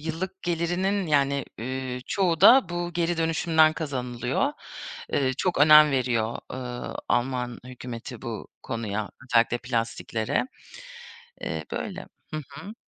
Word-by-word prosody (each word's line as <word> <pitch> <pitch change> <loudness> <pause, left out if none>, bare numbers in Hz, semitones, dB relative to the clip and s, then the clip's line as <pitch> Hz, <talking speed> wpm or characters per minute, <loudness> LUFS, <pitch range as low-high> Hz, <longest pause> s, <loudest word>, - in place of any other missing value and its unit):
yıllık 165 +5 -5
gelirinin, 175 +3 0
yani, 140 -2 +2
eee, 130 +2 -4
çoğu 175 -5 +1
da 255 -6 +8
bu 175 0 -3
geri 170 0 0
dönüşümden 160 -1 +3
kazanılıyor. 130 - -2 0.6
Eee, 130 -2 +2
çok 180 -2 0
önem 150 +1 +8
veriyor, 120 -4 0
ııı, 125 -1 -5
Alman 125 -1 0
hükümeti 125 -2 -8
bu - - -6
konuya, 110 -3 -3
özellikle 120 -1 +3
plastiklere. 115 - -1 1.0
Eee, - - -3
böyle. - - -4 0.3
Hı 155 - -2
hı. 160 +10 -9
140 Hz, 115 wpm, -26 LUFS, 125-170 Hz, 1.0 s, da